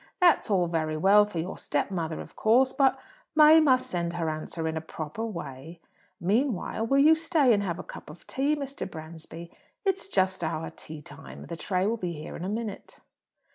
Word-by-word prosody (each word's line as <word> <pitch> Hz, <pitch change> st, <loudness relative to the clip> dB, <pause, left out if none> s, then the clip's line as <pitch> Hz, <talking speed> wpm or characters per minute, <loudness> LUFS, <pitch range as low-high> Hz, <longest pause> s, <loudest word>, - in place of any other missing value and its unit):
That's 350 Hz, -9 st, +4 dB
all 190 Hz, -4 st, +3 dB
very 155 Hz, -2 st, -1 dB
well 200 Hz, +5 st, +6 dB
for 205 Hz, -4 st, -8 dB
your 170 Hz, +4 st, -4 dB
step -, -, -1 dB
mother, 165 Hz, -3 st, -3 dB
of -, -, -12 dB
course; 255 Hz, +4 st, +3 dB
but 275 Hz, -2 st, +3 dB, 0.4 s
May 310 Hz, +1 st, +8 dB
must 260 Hz, -5 st, +4 dB
send 170 Hz, -1 st, -2 dB
her 165 Hz, -2 st, -1 dB
answer 160 Hz, +1 st, -4 dB
in 160 Hz, -, -2 dB
a 160 Hz, -, -2 dB
proper 160 Hz, +5 st, -6 dB
way. 165 Hz, -, -7 dB, 0.4 s
Meanwhile, 220 Hz, +2 st, 0 dB
will 275 Hz, -, +3 dB
you 300 Hz, +3 st, +7 dB
stay 320 Hz, -5 st, +3 dB
and 205 Hz, -, +2 dB
have 175 Hz, -4 st, -2 dB
a -, -, -6 dB
cup -, -, -11 dB
of -, -, -13 dB
tea, 280 Hz, +3 st, 0 dB
Mr. 280 Hz, -7 st, -5 dB
Bransby? 165 Hz, +1 st, -10 dB, 0.3 s
It's 385 Hz, 0 st, 0 dB
just 190 Hz, -, +1 dB
our 160 Hz, 0 st, -3 dB
teatime. 150 Hz, -2 st, -10 dB
The 170 Hz, -, -4 dB
tray 185 Hz, +3 st, -1 dB
will 225 Hz, +3 st, 0 dB
be 180 Hz, -5 st, -3 dB
here 150 Hz, -1 st, -8 dB
in -, -, -6 dB
a 185 Hz, -, -3 dB
minute." 215 Hz, -1 st, -5 dB
185 Hz, 195 wpm, -27 LUFS, 165-255 Hz, 0.4 s, May